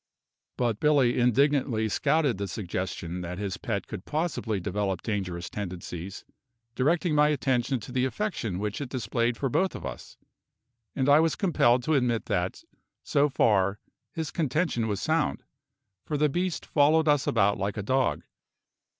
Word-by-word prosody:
But 120 Hz, -4 st, 0 dB
Billy 140 Hz, -5 st, +3 dB
indignantly 125 Hz, -2 st, +2 dB
scouted 140 Hz, -1 st, +1 dB
the 100 Hz, -, -2 dB
suggestion 90 Hz, -3 st, -4 dB
that 90 Hz, +1 st, -5 dB
his 100 Hz, -1 st, -3 dB
pet 100 Hz, -5 st, -3 dB
could 90 Hz, -, -7 dB
possibly 150 Hz, -, -2 dB
develop 95 Hz, 0 st, -2 dB
dangerous 90 Hz, -6 st, -3 dB
tendencies, 90 Hz, -1 st, -6 dB, 0.5 s
directing 160 Hz, +6 st, +1 dB
my 150 Hz, 0 st, +5 dB
attention 130 Hz, -3 st, +1 dB
to 115 Hz, -, -9 dB
the 130 Hz, 0 st, +1 dB
affection 130 Hz, -, -2 dB
which 105 Hz, +6 st, -3 dB
it 140 Hz, -, -4 dB
displayed 120 Hz, -1 st, -1 dB
for 135 Hz, -, -1 dB
both 185 Hz, +9 st, 0 dB
of -, -, -7 dB
us; 65 Hz, -3 st, -8 dB, 0.8 s
and 135 Hz, -1 st, 0 dB
I 145 Hz, +1 st, +7 dB
was 160 Hz, 0 st, +2 dB
compelled 130 Hz, -10 st, +3 dB
to 155 Hz, -, +1 dB
admit 125 Hz, -5 st, +1 dB
that, 90 Hz, -1 st, -2 dB, 0.4 s
so 145 Hz, +1 st, +2 dB
far, 100 Hz, -6 st, +2 dB, 0.3 s
his 160 Hz, -2 st, -4 dB
contention 150 Hz, -6 st, 0 dB
was 100 Hz, -3 st, -2 dB
sound, -, -, 0 dB, 0.6 s
for 150 Hz, -, -2 dB
the 150 Hz, +1 st, +3 dB
beast 180 Hz, +4 st, -2 dB
followed 155 Hz, +2 st, +3 dB
us 145 Hz, -2 st, +3 dB
about 100 Hz, -3 st, +2 dB
like 100 Hz, +1 st, -2 dB
a 105 Hz, -, -2 dB
dog. 130 Hz, +4 st, +1 dB
120 Hz, 155 wpm, -27 LUFS, 100-145 Hz, 0.8 s, I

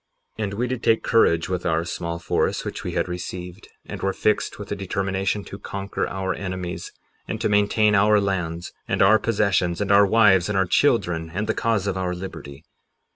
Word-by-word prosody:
58:12 -, -, 0 dB
And 100 Hz, -, -5 dB
we 120 Hz, +4 st, -1 dB
did 125 Hz, -1 st, -3 dB
take 115 Hz, -1 st, +2 dB
courage 85 Hz, -8 st, +3 dB
with 90 Hz, -1 st, -2 dB
our 80 Hz, 0 st, 0 dB
small 85 Hz, -1 st, -4 dB
force 85 Hz, +1 st, -1 dB
which -, -, -5 dB
we -, -, -4 dB
had -, -, 0 dB
received, 90 Hz, +2 st, -7 dB, 0.2 s
and -, -, -7 dB
were 95 Hz, 0 st, 0 dB
fixed 105 Hz, +2 st, 0 dB
with 105 Hz, -, -9 dB
a -, -, 0 dB
determination 95 Hz, +1 st, -2 dB
to 100 Hz, -, -9 dB
conquer 100 Hz, 0 st, -4 dB
our 95 Hz, 0 st, -2 dB
enemies, 95 Hz, -2 st, -5 dB, 0.4 s
and -, -, -4 dB
to -, -, 0 dB
maintain 105 Hz, +1 st, +3 dB
our 105 Hz, +1 st, +5 dB
lands, 90 Hz, -4 st, -2 dB, 0.2 s
and -, -, +2 dB
our 110 Hz, +3 st, +6 dB
possessions, 100 Hz, -5 st, +1 dB
and 100 Hz, -1 st, -1 dB
our 100 Hz, 0 st, +6 dB
wives, 95 Hz, -4 st, +4 dB
and 105 Hz, -, 0 dB
our 95 Hz, -, +3 dB
children, 90 Hz, -, +1 dB
and 105 Hz, +2 st, -1 dB
the -, -, 0 dB
cause 115 Hz, -4 st, 0 dB
of 95 Hz, -2 st, -1 dB
our 90 Hz, -1 st, -2 dB
liberty. 80 Hz, -6 st, -8 dB
95 Hz, 200 wpm, -23 LUFS, 90-105 Hz, 0.4 s, our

